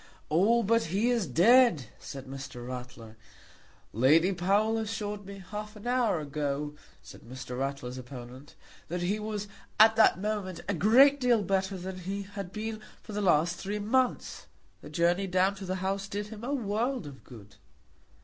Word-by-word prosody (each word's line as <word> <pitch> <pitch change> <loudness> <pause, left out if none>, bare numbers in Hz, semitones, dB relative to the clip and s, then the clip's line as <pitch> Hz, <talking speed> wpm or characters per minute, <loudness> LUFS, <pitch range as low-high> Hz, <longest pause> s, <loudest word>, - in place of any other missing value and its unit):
"Oh, 215 +9 +4
but 230 +3 +2
he 200 +9 +1
is 230 -7 0
dead," 220 - +5
said 135 -1 -8
Mr. 130 -2 -8
Ratler. 125 -3 -8 0.8
"Lady 155 - +4
Powell 205 +5 +1
assured 210 -2 -4
me 195 -1 -9
half 210 +1 -6
an 210 - -12
hour 240 -7 +1
ago," 145 0 -3 0.3
said - - -13
Mr. 125 +1 -7
Ratler's 135 -2 -4
opponent, 125 +1 -10 0.3
"that 175 +1 -3
he 200 +4 0
was 210 -1 -4 0.3
at 220 +1 +8
that 220 - +6
moment 200 -3 -3
a 200 - 0
great 255 - +5
deal 240 -4 +3
better 190 0 0
than 185 +1 -6
he 195 +3 -4
had 200 -2 -7
been 215 +1 -5 0.2
for 215 - -9
the 210 - -2
last 170 -2 +2
three 205 +2 -4
months. 245 +5 -1 0.3
The - - -10
journey 175 +3 +1
down 185 +2 +2
to 195 0 -8
the 185 - -1
House 195 +1 -1
did 205 +1 -4
him 220 0 -9
a 260 - -3
world 240 - -1
of 140 -2 -11
good." 105 -5 -14
195 Hz, 170 wpm, -29 LUFS, 150-215 Hz, 0.8 s, at